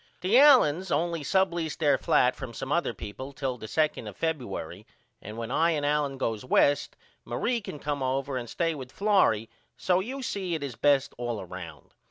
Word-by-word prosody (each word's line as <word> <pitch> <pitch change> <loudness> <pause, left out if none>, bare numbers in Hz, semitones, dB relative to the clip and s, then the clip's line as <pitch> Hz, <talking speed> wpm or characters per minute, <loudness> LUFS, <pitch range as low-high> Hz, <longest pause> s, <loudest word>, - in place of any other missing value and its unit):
The 205 +8 +4
Allens 190 - +5
only 170 0 0
subleased 175 -2 0
their 145 -4 +3
flat 125 -1 +2
from 130 -4 -8
some 135 +1 -5
other 170 -5 +1
people 115 +6 -8
till 130 -3 -3
the 110 - -7
2 155 -4 0
of 105 - -9
Febuery 110 - -4 0.4
and 105 +2 -8
when 115 +1 -5
I 165 +5 +3
and 145 -2 -1
Allen 145 -2 0
goes 115 -5 -2
West 140 +2 +2 0.3
Marie 240 -1 -1
can 175 - -7
come 145 -1 -3
over 135 +1 -1
and 120 -2 -4
stay 165 +4 0
with 130 -4 -8
Florrie 195 - +2 0.3
so 180 -1 +2
you 260 +7 -5
see 190 -7 -2
it 155 - -4
is 135 -4 -5
best 140 0 +2
all 120 -5 -3
round. 85 -4 -10
145 Hz, 190 wpm, -27 LUFS, 120-170 Hz, 0.4 s, Allens